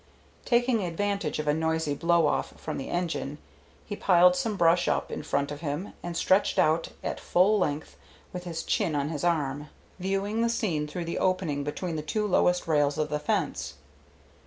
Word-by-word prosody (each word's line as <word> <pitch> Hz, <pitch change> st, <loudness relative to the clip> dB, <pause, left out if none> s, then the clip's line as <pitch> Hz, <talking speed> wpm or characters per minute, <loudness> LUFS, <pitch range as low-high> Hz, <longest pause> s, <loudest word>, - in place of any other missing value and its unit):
Taking 240 Hz, -2 st, +2 dB
advantage 195 Hz, -1 st, -1 dB
of 155 Hz, 0 st, -3 dB
a 150 Hz, -, +4 dB
noisy 160 Hz, -1 st, 0 dB
blow 170 Hz, +2 st, +3 dB
off 145 Hz, -, -1 dB
from -, -, -4 dB
the 135 Hz, -, -6 dB
engine, 165 Hz, -5 st, -2 dB, 0.5 s
he 205 Hz, -, -5 dB
piled 180 Hz, -2 st, +5 dB
some 220 Hz, -2 st, -1 dB
brush 170 Hz, 0 st, +4 dB
up -, -, 0 dB
in -, -, -4 dB
front 140 Hz, +1 st, -1 dB
of 145 Hz, +1 st, -7 dB
him 160 Hz, +5 st, -4 dB
and 175 Hz, -1 st, -4 dB
stretched 190 Hz, +2 st, +2 dB
out 160 Hz, +2 st, +3 dB, 0.2 s
at -, -, -3 dB
full 200 Hz, +4 st, +3 dB
length 150 Hz, -3 st, -2 dB, 0.4 s
with 180 Hz, -1 st, -5 dB
his 165 Hz, -2 st, -4 dB
chin 155 Hz, -, 0 dB
on 145 Hz, 0 st, 0 dB
his 155 Hz, -1 st, -4 dB
arm, 150 Hz, -4 st, 0 dB, 0.3 s
viewing 195 Hz, +4 st, -1 dB
the 235 Hz, -, +2 dB
scene 170 Hz, -10 st, -1 dB
through 170 Hz, +3 st, -5 dB
the 170 Hz, -, -3 dB
opening 180 Hz, -6 st, 0 dB
between 160 Hz, +3 st, -3 dB
the -, -, -2 dB
two 210 Hz, +8 st, -1 dB
lowest 180 Hz, -2 st, +2 dB
rails 145 Hz, -2 st, +2 dB
of 150 Hz, -1 st, 0 dB
the 150 Hz, 0 st, -1 dB
fence. 145 Hz, -, -2 dB
170 Hz, 185 wpm, -27 LUFS, 150-190 Hz, 0.5 s, piled